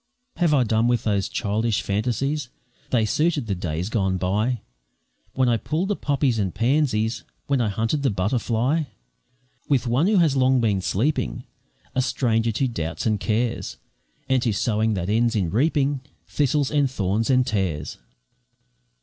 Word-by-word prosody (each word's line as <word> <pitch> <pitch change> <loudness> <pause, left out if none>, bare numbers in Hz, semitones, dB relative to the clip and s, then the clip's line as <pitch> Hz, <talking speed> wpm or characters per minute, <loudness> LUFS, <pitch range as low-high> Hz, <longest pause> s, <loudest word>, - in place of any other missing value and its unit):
Have 170 -3 +2
I 140 -4 +4
done 110 0 +1
with 120 -2 +1
those 100 -3 0
childish 110 +2 -1
fancies? 125 +7 -1 0.4
They 115 -4 +2
suited 150 +4 +1
the 105 - -2
days 90 -1 -3
gone 95 -4 0
by, 105 +6 0 0.7
When 130 -1 +2
I 120 -1 +3
pulled 165 - -2
the 205 - +1
poppies 140 -7 0
and 95 -3 -1
pansies, 120 -3 +1 0.2
When 140 -3 +1
I 110 - +1
hunted 115 +8 -1
the 135 - +2
butterfly, 115 - 0 0.8
With 135 -3 +2
one 125 +9 +2
who 210 -1 +3
has 160 -6 +3
long 130 -1 +3
been 105 -5 +1
sleeping, 105 - -1 0.5
A 130 - +1
stranger 115 -3 +1
to 130 +5 0
doubts 80 -9 -4
and 110 -2 +1
cares, 115 +3 -1 0.5
And 130 -1 +2
to 120 - +1
sowing 110 +1 0
that 90 -2 -3
ends 115 +3 +2
in 90 -6 0
reaping 140 +2 +1 0.3
Thistles, 145 -1 +1
and 145 -3 +2
thorns, 110 -1 -1
and 130 -1 +4
tares. 90 - -2
115 Hz, 160 wpm, -23 LUFS, 105-135 Hz, 0.8 s, I